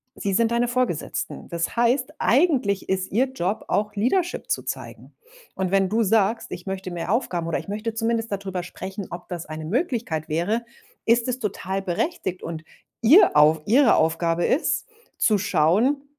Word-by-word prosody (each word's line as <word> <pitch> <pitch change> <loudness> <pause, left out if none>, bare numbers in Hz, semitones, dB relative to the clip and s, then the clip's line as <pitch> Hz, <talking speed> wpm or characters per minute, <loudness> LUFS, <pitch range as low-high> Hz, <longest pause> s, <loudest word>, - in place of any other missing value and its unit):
sie 200 -1 -2
sind 230 +1 +2
deine 240 +1 +2
Vorgesetzten. 245 -10 -2
Das 170 +4 -2
heißt, 245 +2 +1
eigentlich 250 - +2
ist 190 0 -1
ihr 255 +6 +2
Job 200 -4 -2
auch 210 0 -1
Leadership 340 - 0
zu - - +1
zeigen. - - -7 0.4
Und 190 -1 -2
wenn 195 -1 +3
du 225 +2 +2
sagst: 225 +2 +1
„Ich - - -7
möchte 190 -1 -4
mehr 175 +2 -3
Aufgaben 175 -8 -1
oder 165 - 0
ich - - -7
möchte 215 +2 -4
zumindest 225 -1 -1
dadrüber 190 -2 -3
sprechen, 190 +2 -7
ob 175 - -8
das 175 -4 -6
eine 155 0 -6
Möglichkeit 220 - -2
wäre“, 190 +9 0 0.4
ist 230 +1 +3
es 250 0 -2
total 195 -3 -3
berechtigt 185 - -2
und 165 -1 -6 0.4
ihr 285 - +6
auf 150 +1 +5
ihre 250 +3 +5
Aufgabe 165 +1 +1
ist 315 - +1 0.3
zu 210 -2 +3
schauen: 200 - +2
205 Hz, 165 wpm, -24 LUFS, 175-235 Hz, 0.4 s, ihr